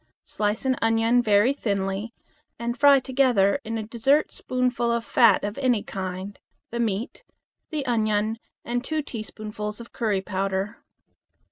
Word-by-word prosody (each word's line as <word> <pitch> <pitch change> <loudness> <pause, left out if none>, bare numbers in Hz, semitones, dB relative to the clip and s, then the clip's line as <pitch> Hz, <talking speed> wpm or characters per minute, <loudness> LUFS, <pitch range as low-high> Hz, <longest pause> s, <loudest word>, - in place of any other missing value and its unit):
Slice 210 +4 -2
an 260 -1 +2
onion 225 +2 +3
very 215 +3 +4
thinly, 200 -3 -2 0.5
and 235 0 -3
fry 280 +1 +6
together 255 -4 +2
in 225 +1 -3
a 220 - -3
dessert 240 +7 +2
spoonful 250 -2 -1
of 235 -1 -1
fat 230 0 +4
of 205 +5 -3
any 245 -6 +2
kind, 190 +1 -5 0.3
the 235 - -3
meat, 230 - -2 0.6
onion, 220 -2 0 0.3
and 245 +1 -2
two 310 +2 -2
teaspoonfuls 215 -3 -6
of 235 - -11
curry 215 -5 0
powder. 195 +1 -3
225 Hz, 135 wpm, -25 LUFS, 205-245 Hz, 0.6 s, fry